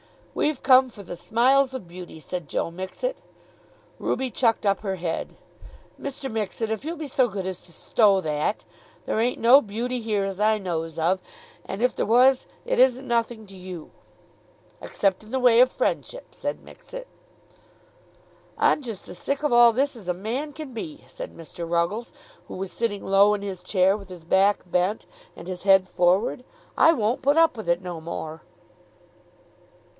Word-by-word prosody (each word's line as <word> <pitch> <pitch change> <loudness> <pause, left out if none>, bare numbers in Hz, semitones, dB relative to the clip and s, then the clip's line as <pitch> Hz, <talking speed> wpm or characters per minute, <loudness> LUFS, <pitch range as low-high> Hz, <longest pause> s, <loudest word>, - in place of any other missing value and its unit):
"We've 300 -3 -1
come 260 0 +6
for 205 -4 -12
the 175 -1 -8
smiles 265 +6 +2
of 235 -9 -7
beauty," 175 -2 -10
said 175 0 -6
Joe 165 - -2
Mixet. 190 - -4 0.8
Ruby 260 -1 -1
chucked 225 -3 +1
up 200 -1 +2
her 195 -3 -3
head. 175 -2 -4 0.7
"Mr. 270 -1 -5
Mixet, 220 0 -2
if 220 - -3
you'll 330 +3 -4
be 305 -2 -6
so 255 -1 +3
good 195 -4 -5
as 185 -1 -3
to 175 - -8
stow 200 +3 +3
that! 155 +4 -1 0.4
There - - -1
ain't 245 +2 0
no 250 +5 +7
beauty 240 +3 -3
here 215 -3 -1
as 195 -1 -4
I 215 +1 +3
knows 165 -5 -4
of, 175 +4 +1 0.4
and 195 +5 -4
if 250 - +2
there - - 0
was 255 +3 +4 0.2
it - - 0
isn't 260 +1 +4
nothing 235 -2 -1
to 195 - -13
you." 180 -3 -9 0.9
"Except 195 0 0
in 215 - -15
the 260 +2 -1
way 245 -2 +5
of 255 +1 +7
friendship," - - -2
said - - -4
Mixet. - - -10 1.5
"I'm - - +3
just 225 -7 -7
as 175 - -8
sick 280 +1 -2
of 295 - +1
all 240 0 +8
this 270 +4 0
as 215 -6 -11
a 180 - +1
man 245 +10 -4
can 300 -4 -8
be," 295 +5 -7
said - - -9
Mr. 165 +1 -8
Ruggles, 175 +7 -1 0.4
who - - -8
was 190 0 -5
sitting 220 -4 -2
low 200 +2 +5
in 200 - -6
his 190 -3 -5
chair, 185 +1 +2
with 200 -2 -10
his 180 -3 -10
back 195 +4 +3
bent, 180 +4 0 0.3
and 170 - -11
his 185 -1 -5
head 195 -1 +5
forward. 185 +8 +1 0.3
"I 325 - +6
won't 230 -3 0
put 285 +3 +3
up 330 -3 +5
with 220 -5 -6
it 170 +1 +2
no 175 -2 -5
more." 160 -1 -6
215 Hz, 180 wpm, -25 LUFS, 185-255 Hz, 1.5 s, all